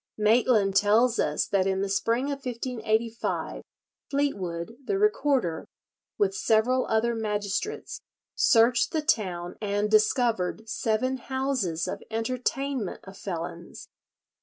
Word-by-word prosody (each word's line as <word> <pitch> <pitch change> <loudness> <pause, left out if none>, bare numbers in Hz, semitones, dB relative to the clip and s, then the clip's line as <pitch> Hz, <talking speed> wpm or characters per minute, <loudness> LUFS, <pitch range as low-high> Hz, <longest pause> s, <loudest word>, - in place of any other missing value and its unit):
Maitland 215 -2 +3
tells 220 +4 +4
us 150 0 +1
that 195 -1 +1
in 190 0 0
the 200 - 0
spring 230 +7 0
of 275 -1 -5
1585, 230 -2 -2 0.5
Fleetwood, 200 -9 -2
the 390 - -1
recorder, 280 - +1 0.5
with 410 -2 +2
several 255 - +2
other 225 +2 +1
magistrates 210 - -3 0.3
searched 235 0 +4
the 315 -2 0
town 185 - -1
and 205 0 -1
discovered 220 -1 +2
seven 230 +4 0
houses 255 -11 -2
of - - -4
entertainment 255 +1 -2
of 195 0 -11
felons. 170 -3 -7
225 Hz, 110 wpm, -27 LUFS, 200-255 Hz, 0.5 s, tells